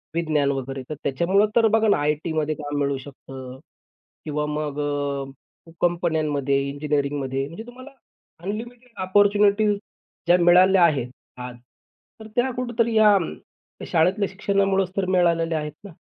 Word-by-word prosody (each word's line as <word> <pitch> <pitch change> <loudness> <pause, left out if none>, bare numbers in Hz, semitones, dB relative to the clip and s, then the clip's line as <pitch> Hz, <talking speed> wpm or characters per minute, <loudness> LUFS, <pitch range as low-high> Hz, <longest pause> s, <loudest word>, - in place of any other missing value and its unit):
विज्ञान 155 -4 +1
वगैरे, 135 0 -4
तर 155 - -4
त्याच्यामुळं 170 +9 +2
तर 230 -1 +5
बघा 220 0 +2
ना, 205 - +4
आयटीमध्ये 150 +1 -1
काम 145 -1 -5
मिळू 140 -1 0
शकतं. 130 -1 -10 0.7
किंवा 150 -1 -2
मग 150 -1 -3
अ, 145 +1 -5
कंपन्यांमध्ये, 155 -5 +1
इंजिनिअरिंगमध्ये 140 -2 -2
म्हणजे 170 +9 -9
तुम्हाला 255 +3 -12 0.5
अनलिमिटेड 235 +5 -6
ऑपर्चुनिटी 205 +2 +3
ज्या 180 -3 -2
मिळाल्या 180 +1 +6
आहेत 135 -7 +2 0.3
आज. 125 -1 -7 0.6
तर 220 - -10
त्या 250 +2 +1
कुठेतरी 235 -2 -1
या 210 -2 +6 0.7
शाळेतल्या 190 +5 +2
शिक्षणामुळेच 195 -1 0
तर 195 - +1
मिळालेल्या 165 -2 +2
आहेत 150 0 -5
ना. 200 - -9
165 Hz, 125 wpm, -23 LUFS, 145-200 Hz, 0.7 s, मिळाल्या